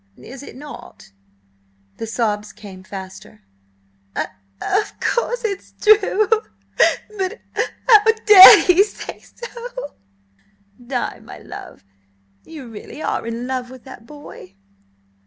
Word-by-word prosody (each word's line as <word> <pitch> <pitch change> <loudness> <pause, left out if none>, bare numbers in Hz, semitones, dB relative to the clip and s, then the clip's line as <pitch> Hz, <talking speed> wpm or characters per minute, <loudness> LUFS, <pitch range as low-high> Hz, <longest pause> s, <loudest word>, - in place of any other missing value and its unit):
"Is 245 - -12
it 285 - -12
not?" 290 - -12 0.9
The 225 - -6
sobs 210 -3 -2
came 190 -3 -12
faster. 190 - -11 0.7
"Of–of 100 - -4
course 485 +1 -1
'tis 400 -3 -5
true, 425 -1 +3 0.9
but 380 +1 -1 0.2
h - - -1 0.2
how 435 -4 +7 0.2
dared 405 -3 +10
he 365 +2 +5
say 420 - -9
so?" 485 -4 -9 0.9
"Di, 245 0 -4
my - - -12
love, - - -12 0.6
you 300 -6 -11
really 225 +7 -10
are - - -3
in 230 +1 -5
love 255 -1 -4
with 255 -1 -13
that 260 -4 -13
boy?" 290 -10 -13
265 Hz, 115 wpm, -19 LUFS, -, 0.9 s, dared